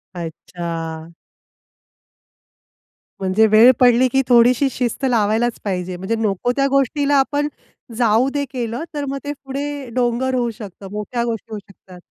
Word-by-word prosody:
अच्छा! 165 -1 -6 2.1
म्हणजे 195 +3 +3
वेळ 220 +4 +7
पडली 250 0 +5
की 270 - +3
थोडीशी 245 +2 +5
शिस्त 245 +2 -2
लावायलाच 225 +1 +1
पाहिजे 180 -2 -3
म्हणजे 190 +5 -2
नको 215 +3 0
त्या 275 0 +2
गोष्टीला 280 +1 +1
आपण 285 +2 +1 0.5
जाऊ 235 +2 +3
दे 285 -1 0
केलं, 240 +2 -3
तर 290 -1 -3
मग 275 +1 -3
ते 290 - -3
पुढे 280 -1 -5
डोंगर 250 +1 0
होऊ 240 -1 0
शकतं 200 -2 -10
मोठ्या 210 +3 -3
गोष्टी 225 -1 -4
होऊ 210 - -4
शकतात. 190 -2 -16
235 Hz, 140 wpm, -20 LUFS, 200-265 Hz, 2.1 s, वेळ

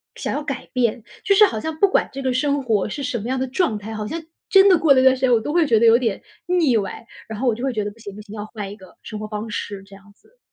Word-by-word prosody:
想 - - -4
要 295 - -3
改 275 -3 -5
变。 235 -3 0 0.2
就 395 - +3
是 425 - +8
好 220 - -2
像 315 +5 -5
不 400 - +6
管 385 - +1
这 275 0 -6
个 260 -1 0
生 280 +2 0
活 215 -4 0
是 280 +5 -5
什 250 -3 -2
么 215 - -6
样 260 0 -1
的 265 - -1
状 255 - 0
态， 210 +2 -8
好 215 -1 -4
像 325 +7 -4 0.3
真 390 0 +7
的 365 -4 +5
过 315 -4 +5
了 260 - +4
一 - - +2
段 260 0 +6
时 260 - -11
间， 260 - +3
我 235 - +5
都 295 +7 -4
会 340 -3 +3
觉 225 -5 +4
得 230 - +3
有 225 - +7
点， 225 -6 -2 0.2
腻 340 -8 +2
歪。 205 +2 -4 0.2
然 220 -1 -7
后 260 - -1
我 235 - +3
就 240 - -6
会 270 - 0
觉 215 -3 -2
得 210 - -4
不 220 - -20
行， 200 -3 -9
不 210 - -9
行， 210 0 -12
要 205 - -5
换 210 -2 -7
一 - - -8
个 190 -4 -17
生 215 - -7
活 215 - -5
方 210 +1 -5
式， 200 -1 -5
这 195 0 -15
样 200 +1 -18
子。 - - -30
240 Hz, 355 characters per minute, -21 LUFS, 210-285 Hz, 0.3 s, 是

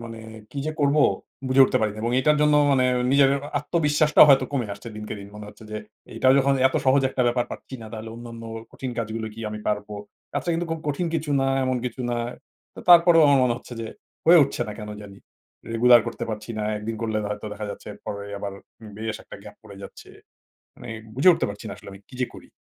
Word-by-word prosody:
মানে 115 -1 -8 0.3
কি 140 - -7
যে 155 - -2
করব 145 +1 +3 0.5
বুঝে 135 +1 +6
উঠতে - - +1
পারিনা 105 0 -1
এবং 115 - 0
এটার 150 +3 +3
জন্য 150 0 +4 0.2
মানে 130 -2 +3 0.3
নিজের 140 -1 +5 0.3
আত্মবিশ্বাসটাও 150 -1 +4
হয়তো 135 -1 +6
কমে 130 -5 -1
আসছে 105 +3 -10
দিনকে 105 0 -6
দিন। 100 0 -10
মনে 105 0 -9
হচ্ছে 105 +1 -14
যে 110 - -4 0.4
"এটাও 130 +3 +4
যখন 140 0 +3
এত 130 - -1
সহজ 135 +1 +4
একটা 130 - 0
ব্যাপার 120 0 +1
পাচ্ছি - - -9
না - - -8
তাহলে 110 0 -7
অন্যান্য 115 0 -9 0.3
কঠিন 130 - -5
কাজগুলো 110 0 -3
কি 115 - -9
আমি 105 - -5
পারব?" 105 -1 -1 0.5
আচ্ছা 145 +5 -3
কিন্তু 170 +1 -2
খুব 165 -1 -3
কঠিন 145 +5 -1
কিছু 155 -2 -2
না 135 - +1 0.2
এমন 130 0 0
কিছু 125 0 -5
না। 120 - -1 0.6
তো - - -9
তারপরেও 170 -1 +8
আমার 140 -1 +5
মনে 120 - +1
হচ্ছে 125 - -13
যে 115 - -4 0.4
হয়ে 170 +1 +8
উঠছে 130 - -3
না - - -4
কেন 105 -1 -7
জানি। 100 -1 -12 0.5
রেগুলার 120 +1 +6
করতে - - -4
পারছি 105 +1 -6
না। - - -2
১ 105 - -7
দিন 115 - -2
করলে 110 -1 -1
হয়তো 105 +1 -5
দেখা 105 0 -6
যাচ্ছে - - -9 0.5
আবার 100 0 -5 0.4
বেশ 110 0 -4
একটা - - -11
গ্যাপ - - -12
পড়ে 105 -2 -13
যাচ্ছে। - - -11 0.7
মানে 120 - -10 0.3
বুঝে 145 +8 +6
উঠতে - - -1
পারছি 100 +3 -9
না 100 - -6
আসলে - - -12
আমি 95 0 -12
কী 130 - -12
যে 125 - +1
করি? - - -14
120 Hz, 215 wpm, -24 LUFS, 110-140 Hz, 0.7 s, তারপরেও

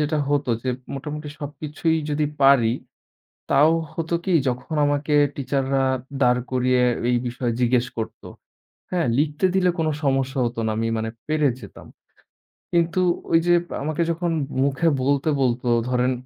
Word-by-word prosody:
যেটা 150 +1 0
হতো 145 -3 +1
যে, 130 - -1 0.2
মোটামুটি 150 +2 -6
সবকিছুই 155 +2 -2
যদি 150 +1 +1 0.2
পারি, 135 -5 +5 0.8
তাও 150 +3 +5 0.2
হতো 165 +1 -2
কি, 190 - +1
যখন 125 +5 -3
আমাকে 145 +1 0 0.2
টিচাররা 135 -1 0 0.4
দাঁড় 125 -1 +3
করিয়ে 125 0 +2 0.3
এই 125 - +3
বিষয়ে 120 0 -2
জিজ্ঞেস 125 0 +3
করত। 110 - -5 0.7
হ্যাঁ, 175 -5 +1
লিখতে 150 +4 +1
দিলে 185 -1 +3
কোনো 155 -1 +1
সমস্যা 135 -1 0
হত 120 +1 -3
না। 110 - 0
আমি 115 - 0
মানে 110 0 -2 0.2
পেরে 155 -2 +2
যেতাম। 100 - -12 0.9
কিন্তু 170 +1 +2 0.3
ওইযে 165 +1 +4 0.3
আমাকে 155 +3 -2
যখন 170 +1 -1 0.3
মুখে 140 +4 +1 0.2
বলতে 140 +3 +1
বলতো, 125 -1 0 0.2
ধরেন 125 0 +1
140 Hz, 140 wpm, -23 LUFS, 125-155 Hz, 0.9 s, পারি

